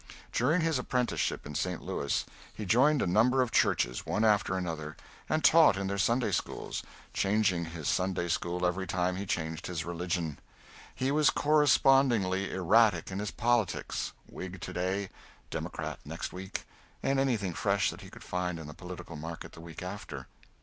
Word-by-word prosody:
During 150 +9 +2
his 160 -4 +1
apprenticeship 125 -1 -1
in 75 - -7
St. 90 +4 -1
Louis 70 - -1 0.3
he 105 - -5
joined 135 +9 +4
a - - +1
number 120 +8 +4
of 120 - -4
churches, - - +2
one 110 - 0
after 105 -3 +3
another, 80 -4 -4 0.3
and 155 - +1
taught 160 -11 +7
in 100 - -2
their 100 +1 -2
Sunday 115 +6 +2
schools - - -3 0.3
changing 100 -4 +2
his 80 -3 -6
Sunday 90 -1 0
school 85 +1 -1
every 95 +2 0
time 90 +1 0
he 100 +1 -4
changed 80 -2 -2
his 85 -3 -3
religion. 85 -2 -2 0.6
He 130 +1 0
was 150 0 +4
correspondingly 135 -10 +4
erratic 95 0 +3
in 95 - -3
his 105 0 -2
politics 120 -4 0 0.2
Whig 95 0 -7
to - - -6
day, 95 +2 -1 0.4
Democrat - - -4
next - - -5
week, 95 +1 -5 0.4
and 135 0 +2
anything 115 -9 +1
fresh - - +1
that - - -10
he - - -10
could - - -12
find 90 -1 -2
in 80 - -7
the 75 - -8
political 90 0 -8
market 80 +2 -7
the 80 - -12
week 85 0 -8
after. 90 -8 -6
95 Hz, 170 wpm, -30 LUFS, 85-115 Hz, 0.6 s, taught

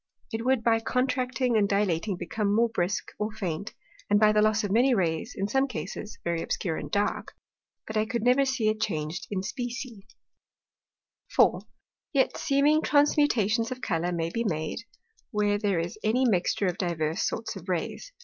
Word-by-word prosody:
It 225 0 -2
would 255 -2 +2
by 225 -1 +3
contracting 255 0 0
and 205 -2 +3
dilating 200 -1 0
become 205 +1 -1
more 235 +1 +3
brisk, 190 -3 -1
or 210 +1 -1
faint, 200 -2 -4 0.3
and 205 0 +4
by 215 0 +6
the 210 0 +3
loss 215 0 +3
of 205 - -2
many 245 +4 +4
Rays 175 +3 -1
in 195 - -1
some 270 +5 +2
Cases 215 -2 -6
very 170 -1 -1
obscure 165 -1 -2
and 145 - -5
dark; 205 +5 -1 0.5
but 220 - -7
I 215 0 +1
could 235 -1 -2
never 250 +3 +4
see 265 -5 0
it 215 0 -2
chang'd 170 -4 -2
in 190 -2 -2
specie. 235 -2 -5 1.3
4. - - +4 0.5
Yet 270 -2 +2
seeming 295 +1 +3
Transmutations 255 -8 +3
of 255 0 -5
Colours 175 -4 -1
may 165 0 -2
be 230 - -1
made, 155 -7 -2 0.5
where 205 -2 +1
there 200 -4 +1
is 170 +5 -3
any 245 +5 +2
mixture 195 -1 +1
of 180 -1 -1
divers 165 -3 -1
sorts 225 -1 -2
of 190 -1 -9
Rays. 180 - -3
215 Hz, 175 wpm, -27 LUFS, 185-245 Hz, 1.3 s, by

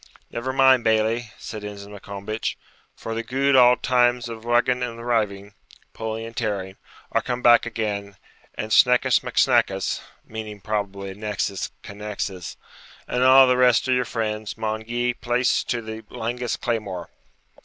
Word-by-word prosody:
'Never 125 +3 -3
mind, 130 -2 +5
Bailie,' 110 +1 +1
said 110 -2 -8
Ensign 100 0 -8
Maccombich, 100 +2 -5 0.4
'for 115 - -6
the 115 - -2
gude 135 +4 +1
auld 125 -1 +6
times 120 -1 +2
of 115 -1 -8
rugging 120 +1 +2
and 115 -1 -4
riving 100 -4 -1 0.4
(pulling 110 0 -4
and 115 0 -10
tearing) 100 -4 -3 0.3
are - - +2
come 125 -1 -4
back 120 0 +6
again, 100 -3 -3 0.4
an' 110 - -5
Sneckus 125 +3 +5
Mac - - -7
Snackus - - +2 0.2
(meaning, 110 -2 -7
probably, 100 -2 -3
annexis, 100 -1 -3
connexis), 100 -3 -6 0.5
and 125 - -1
a' 130 +1 +8
the 125 0 +3
rest 125 0 +4
of 130 - +3
your 125 0 +2
friends, 110 -3 -3
maun 110 0 -2
gie 120 +1 -1
place 120 +1 +1
to 120 -1 -2
the 110 0 -7
langest 120 0 -3
claymore.' 100 -7 -3
115 Hz, 150 wpm, -23 LUFS, 105-120 Hz, 0.5 s, a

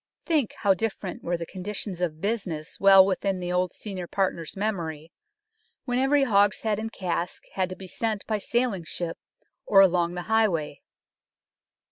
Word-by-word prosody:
Think 305 - +1
how 200 -2 +5
different 195 -2 -4
were 175 0 -1
the 170 - -5
conditions 190 0 -5
of 160 -3 -2
business 185 -7 -3
well 195 -1 +8
within 195 0 -1
the 180 0 -3
old 180 0 +1
senior 190 -4 -7
partner's 185 -3 -2
memory, 170 -6 -3 0.7
when 245 -1 0
every 275 +2 +3
hogshead 210 -2 +2
and 225 0 -4
cask 175 -3 -3
had 185 -1 0
to 185 - -6
be 190 - -10
sent 215 +2 -2
by 215 -2 -1
sailing 235 -4 0
ship 165 +1 -5 0.4
or 195 - +5
along 175 -2 +4
the 175 - -4
highway. 180 -10 +1
190 Hz, 155 wpm, -26 LUFS, 175-215 Hz, 0.7 s, well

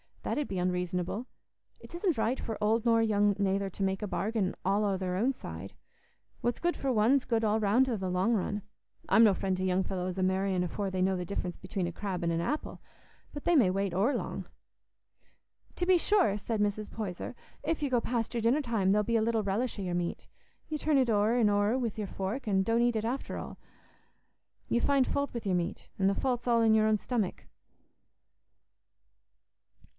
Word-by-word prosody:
That - - -2
'ud 295 - -2
be 190 - -4
unreasonable. 180 +5 -2 0.5
It - - -13
isn't 345 - 0
right 235 +3 0
for 225 - -4
old 220 +2 +2
nor 230 -1 +4
young 205 -2 +3
nayther 195 0 0
to 195 - -4
make 190 0 0
a 210 - -2
bargain 200 -1 -1
all 200 +3 +2
o' 195 -2 +1
their 185 -1 -2
own 240 +8 +1
side. 90 - -8 0.7
What's 240 0 -1
good 345 0 +1
for 270 - -1
one's 245 +4 +3
good 230 -2 0
all 215 0 +2
round 220 +5 +3
i' 240 - 0
the 190 -1 -3
long 185 +6 +1
run. 205 0 -1 0.5
I'm 225 - +6
no 210 -3 +6
friend 190 0 -1
to 185 - -2
young 185 0 +2
fellows 185 -1 -3
a 185 - 0
marrying 190 0 +1
afore 195 +3 -2
they 185 -1 -2
know 190 0 +2
the 180 - -4
difference 180 -1 -4
atween 190 -4 -2
a 175 - -3
crab 185 0 -4
an' 170 - +1
a 165 - 0
apple; 300 - -3 0.5
but 290 - -7
they 345 - +3
may 235 -11 +5
wait 195 0 -1
o'er 205 +10 +2
long." - - -4 1.3
"To 355 - -1
be 370 0 +5
sure," 350 - +2
said 215 +1 -2
Mrs. 205 +1 -1
Poyser; 205 +1 -5 0.3
"if 320 -2 -1
you 285 - +1
go 245 -2 +2
past 230 -1 -2
your 235 - -1
dinner 240 +7 +3
time, 225 -8 +1
there'll 210 0 +3
be 230 +2 +1
little 225 0 +1
relish 220 +5 -1
o' - - -3
your 180 -1 -2
meat. 175 -1 -3 0.4
You 310 - -2
turn 300 -1 +2
it 260 -3 +3
o'er 215 +2 +3
an' 230 -4 +4
o'er 205 +4 +2
wi' 240 -4 -1
your 210 -2 -3
fork, 195 +8 -4
an' 190 -2 +2
don't 230 +3 +2
eat 240 -1 +2
it 220 0 -1
after 250 +4 -3
all. - - -7 1.1
You 235 - +2
find 275 -1 +3
faut 280 +2 -1
wi' 235 - -3
your 190 -3 0
meat, 175 -1 -3
an' 190 - +3
the 195 - +2
faut's 250 0 -1
all 235 -1 +4
i' - - +4
your 220 -1 +4
own 215 0 +3
stomach." 215 -3 -2
210 Hz, 210 wpm, -30 LUFS, 190-240 Hz, 1.3 s, I'm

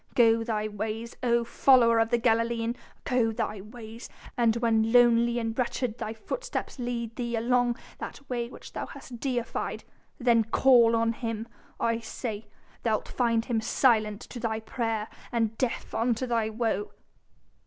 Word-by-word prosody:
Go 230 -1 +5
thy 215 -2 -1
ways, 215 +2 -4
O 235 -1 +2
follower 235 -1 +5
of 225 0 +2
the 240 - +3
Galilean! 230 0 +1 0.3
go 245 -3 +2
thy 215 -2 -3
ways! 225 +2 -10 0.3
and 230 -2 +3
when 225 -1 +2
lonely 240 -1 +5
and 225 -1 -2
wretched 245 -1 -2
thy 215 - -3
footsteps 255 - -5
lead 235 -2 -3
thee 235 -1 -2
along 245 +1 +2 0.2
that 280 - -8
way 240 -2 -2
which - - -12
thou - - -4
hast 240 -3 -10
deified, 245 -3 -2 0.3
then 235 -3 +4
call 230 0 +5
on 230 0 +2
him, 225 -1 -4 0.3
I 230 0 +1
say 220 -1 -5 0.4
thou'lt 220 -2 0
find 230 -2 +1
him 230 -3 0
silent 220 -3 +2
to 245 - -8
thy 220 -1 -1
prayer 225 -1 -2 0.2
and 225 -2 0
deaf 255 -3 -2
unto 235 +2 +1
thy 230 -3 0
woe!" 220 -2 -2
230 Hz, 155 wpm, -28 LUFS, 225-240 Hz, 0.4 s, Go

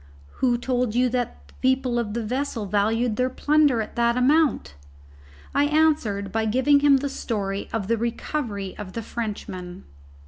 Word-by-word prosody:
"Who 245 -2 +3
told 245 -2 -1
you 250 +1 +3
that 245 -1 -3
the - - -20
people 260 -2 +1
of 215 -2 -3
the 235 - -1
vessel 245 -1 -2
valued 215 +3 +1
their 255 0 +1
plunder 290 -3 +2
at 215 - -12
that 235 0 +2
amount?" 270 - +2 0.8
I 285 - +3
answered 290 -11 +1
by 220 +1 0
giving 260 +6 +3
him 285 -1 +5
the 280 +2 -2
story 200 -7 -3
of 215 -4 -2
the 230 +1 +1
recovery 230 -3 -3
of 195 -3 -7
the 230 - -4
Frenchman. 190 -6 -6
235 Hz, 165 wpm, -24 LUFS, 210-260 Hz, 0.8 s, him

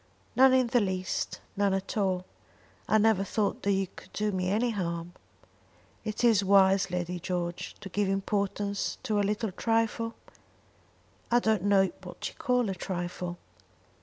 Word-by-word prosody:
"None 265 +1 +7
in 255 -1 +4
the 240 +1 +2
least 185 -3 -2
none 200 -1 +2
at 195 - -4
all. 190 -3 0 0.6
I 215 - +4
never 215 -2 +3
thought 205 +1 -1
that 200 - +1
you 195 0 +2
could 185 - -15
do 210 0 0
me 185 -1 -1
any 230 +5 +1
harm." 170 -4 -3 0.9
"Is 215 +1 -3
it 225 -4 +5
wise, 195 -1 +5
Lady 180 0 -2
George, 175 -1 -3
to - - -7
give 200 +1 0
importance 200 +1 -1
to 215 -5 0
a - - +3
little 210 +1 -1
trifle?" 230 +2 0 1.1
"I 240 - +4
don't 220 -5 +1
know 195 -2 +4
what - - -6
you - - -15
call 250 -5 +1
a - - -2
trifle." 175 -1 -4
200 Hz, 160 wpm, -29 LUFS, 185-220 Hz, 1.1 s, None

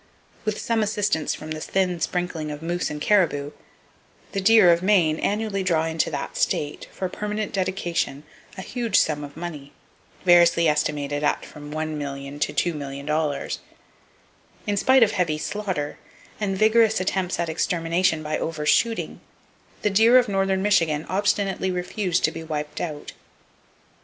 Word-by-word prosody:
With 215 -1 -1
some 230 -1 0
assistance 205 -6 0
from 155 0 -9
the 155 0 -4
thin 180 -1 0
sprinkling 175 -3 -2
of 150 +1 -7
moose 175 +2 -1
and 150 - -5
caribou, 150 -6 +2 0.8
the 195 - -2
deer 210 -3 +7
of 170 0 +2
Maine 180 -6 +3
annually 210 -1 -1
draw 165 -4 +1
into 160 -1 0
that - - -5
state, 150 0 -1
for 190 - -3
permanent 210 +2 -4
dedication, 180 -6 -2 0.3
a 190 - -5
huge 235 -2 0
sum 150 -1 +2
of 145 +1 -10
money, 155 -5 -7 0.5
variously 170 -1 +6
estimated 150 -1 0
at 145 - 0
from 145 -1 -11
$1,000,000 145 -2 -5
to - - +1
$2,000,000. 150 -1 -2 1.1
In 205 - 0
spite 260 +5 +5
of 215 - +3
heavy 165 -4 0
slaughter, 185 -4 -3 0.4
and 195 -3 -1
vigorous 220 0 +4
attempts 185 -1 -1
at 170 - 0
extermination 165 0 0
by 155 0 -2
over 155 -2 -3
shooting, 230 +8 +1 0.6
the 210 - +2
deer 225 +5 +6
of 250 - +4
northern 195 -1 0
Michigan 165 -7 +2
obstinately 195 -1 0
refuse 180 0 -1
to - - +2
be 165 - -7
wiped 150 -2 -4
out. 150 -4 -5
175 Hz, 145 wpm, -24 LUFS, 150-200 Hz, 1.1 s, deer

